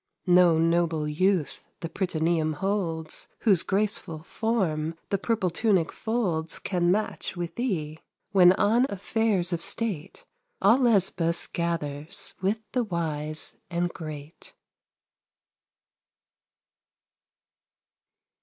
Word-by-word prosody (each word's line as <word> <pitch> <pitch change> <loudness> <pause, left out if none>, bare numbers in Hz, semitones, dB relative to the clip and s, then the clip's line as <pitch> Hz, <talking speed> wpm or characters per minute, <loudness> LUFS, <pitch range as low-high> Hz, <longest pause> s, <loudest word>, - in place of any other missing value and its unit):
No 180 -2 +5
noble 165 -2 +1
youth 165 -1 0
the 165 - -3
prytaneum 165 -2 0
holds, 165 -3 -2
Whose 195 -7 +4
graceful 195 -6 -1
form 170 -8 -1 0.2
the 200 - +1
purple 205 -4 0
tunic 185 -3 +1
folds 185 -9 -1
Can 175 -2 0
match 210 -2 -2
with 175 -1 -4
thee, 160 -11 -3 0.3
when 180 -3 +7
on 230 +7 +3
affairs 200 -2 0
of 170 - -2
state 200 -6 -3 0.3
All 215 +6 +5
Lesbos 190 -8 +2
gathers 155 -3 -2
with 205 +4 0
the 250 +1 +1
wise 155 -5 -2
and 175 0 0
great. 155 -1 -9
175 Hz, 100 wpm, -26 LUFS, 160-200 Hz, 0.3 s, when